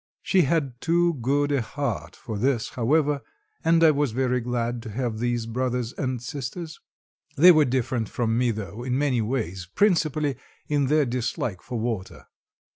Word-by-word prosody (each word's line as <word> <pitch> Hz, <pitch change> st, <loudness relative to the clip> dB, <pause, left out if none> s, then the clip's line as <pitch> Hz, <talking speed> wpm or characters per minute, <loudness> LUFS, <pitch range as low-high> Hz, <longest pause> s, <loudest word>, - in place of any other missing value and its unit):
She 190 Hz, -, +3 dB
had 140 Hz, -5 st, 0 dB
too 170 Hz, +1 st, +2 dB
good 145 Hz, +4 st, +1 dB
a 140 Hz, -3 st, +2 dB
heart 110 Hz, -, -4 dB
for 105 Hz, -2 st, -6 dB
this, 125 Hz, -1 st, +1 dB
however, 145 Hz, +4 st, +1 dB, 0.4 s
and 165 Hz, 0 st, +4 dB
I 160 Hz, -, +8 dB
was 145 Hz, -5 st, 0 dB
very 125 Hz, 0 st, +1 dB
glad 120 Hz, 0 st, -2 dB
to 115 Hz, -, -8 dB
have 115 Hz, 0 st, -3 dB
these 120 Hz, -1 st, -1 dB
brothers 125 Hz, 0 st, -2 dB
and 130 Hz, -3 st, -2 dB
sisters. 145 Hz, +6 st, -6 dB, 0.6 s
They 175 Hz, +5 st, +9 dB
were 155 Hz, -3 st, +5 dB
different 125 Hz, -3 st, -1 dB
from 115 Hz, -2 st, 0 dB
me, 125 Hz, +1 st, +2 dB
though, 105 Hz, -1 st, -5 dB
in 125 Hz, +1 st, -1 dB
many 135 Hz, -4 st, +1 dB
ways, 105 Hz, -7 st, -3 dB
principally, 155 Hz, -8 st, +2 dB, 0.3 s
in 145 Hz, -2 st, +1 dB
their 150 Hz, +1 st, +3 dB
dislike 120 Hz, -5 st, -2 dB
for 125 Hz, -2 st, -5 dB
water. 110 Hz, -5 st, -4 dB
125 Hz, 165 wpm, -25 LUFS, 115-145 Hz, 0.6 s, They